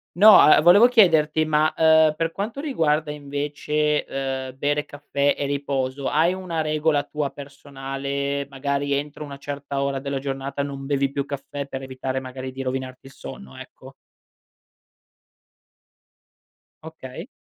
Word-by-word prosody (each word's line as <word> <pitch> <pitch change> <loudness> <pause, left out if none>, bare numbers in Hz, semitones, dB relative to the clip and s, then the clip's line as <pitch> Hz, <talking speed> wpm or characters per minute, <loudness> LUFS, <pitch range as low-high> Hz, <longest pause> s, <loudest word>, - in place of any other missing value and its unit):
No, 210 +2 +9
a 150 - +7
volevo 185 +8 +7
chiederti 160 -10 +4
ma, 155 0 +2
uhm, 160 -1 +5
per 165 0 -1
quanto 210 +9 -5
riguarda 160 - 0
invece, 150 +1 -2
uhm, 135 -1 -4
bere 145 +2 0
caffè 145 0 -1
e 145 - -2
riposo, 140 -1 -2
hai 160 +4 +2
una 180 -4 -3
regola 155 -1 +1
tua 145 -1 -3
personale, 140 0 -5
magari 140 +1 -2
entro 145 +2 -3
una 140 -2 -8
certa 140 0 -4
ora 140 -1 -1
della 140 0 -3
giornata, 135 +1 -4
non 140 -1 -6
bevi 140 -1 0
più 140 0 -2
caffè 140 0 -6
per 135 -1 -6
evitare 130 0 -4
magari 130 0 -7
di 135 +1 -6
rovinarti 130 0 -5
il 135 - -12
sonno, 65 - -10
ecco. - - -12 2.9
Okay. 155 - -9
140 Hz, 140 wpm, -23 LUFS, 135-155 Hz, 2.9 s, No